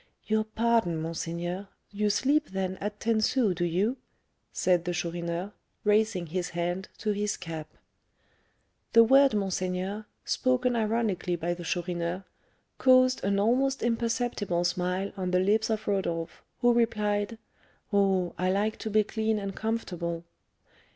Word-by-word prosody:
"Your 215 0 +1
pardon, 220 -6 +1
monseigneur; 170 +4 -4 0.2
you 210 0 0
sleep, 285 +8 +2
then, 190 -1 -2
at 205 +1 -5
ten 225 -1 +1
sous, 220 -3 +2
do 175 0 -2
you?" 190 +9 +1 0.5
said 180 -2 +2
the 175 - -1
Chourineur, 170 +2 -3 0.3
raising 210 -3 +2
his 180 +2 -3
hand 175 +2 -3
to 215 - -1
his 205 0 -1
cap. 160 -3 -6 1.3
The 230 - +9
word 270 +1 +5
monseigneur, 190 +1 -2 0.2
spoken 255 -1 +1
ironically 215 -5 0
by 170 +1 -1
the 175 0 -8
Chourineur, 175 +1 -2 0.6
caused 255 0 +5
an 200 0 +1
almost 260 +6 +2
imperceptible 230 -6 0
smile 180 +2 -1
on 185 -1 -2
the 180 0 +3
lips 210 +4 +2
of 220 -1 -2
Rodolph, 170 -5 -2 0.2
who 240 0 +5
replied, 215 -2 +1 0.6
"Oh, 190 -3 +2
I 185 +1 +2
like 210 +3 0
to 220 - -4
be 215 0 +4
clean 220 +1 -1
and 200 -2 -4
comfortable." 175 -7 -3
200 Hz, 135 wpm, -28 LUFS, 175-220 Hz, 1.3 s, The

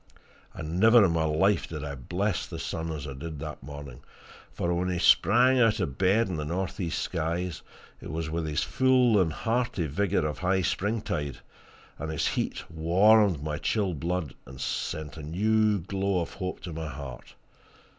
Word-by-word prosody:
And 85 +2 -4
never 110 +1 +7
in 90 - +2
my 80 -1 +1
life 80 +5 +2
did 75 -2 -5
I 70 -1 -4
bless 90 - -2
the - - -7
sun 80 0 -4
as 75 -2 -5
I 70 - -5
did 75 +3 -7
that 75 +1 -7
morning, 70 -2 -9 0.5
for 85 0 -1
when 90 +1 0
he 90 - -1
sprang 125 +8 +5
out 115 -2 +4
of 75 -9 -3
bed 100 +5 +3
in 90 -4 -3
the 75 - -2
northeast 90 +2 -2
skies, 85 +1 -2 0.4
it - - -8
was 80 -1 -3
with 80 0 -2
his 75 0 0
full 125 -5 +4
and 80 -3 +1
hearty 115 -1 -1
vigour 90 +4 0
of 75 +1 -3
high 95 +1 +1
springtide, 95 - -2 0.6
and 80 +1 -4
his 80 - 0
heat - - -2
warmed 90 +1 +4
my 75 0 -3
chilled 90 0 -1
blood 85 -1 -2
and 65 -1 -11
sent 80 0 -3
a - - -7
new 105 +7 +2
glow 95 +1 -1
of 85 - -5
hope 90 0 -5
to 85 - -6
my 80 0 -4
heart. 70 -3 -8
85 Hz, 180 wpm, -28 LUFS, 75-100 Hz, 0.6 s, never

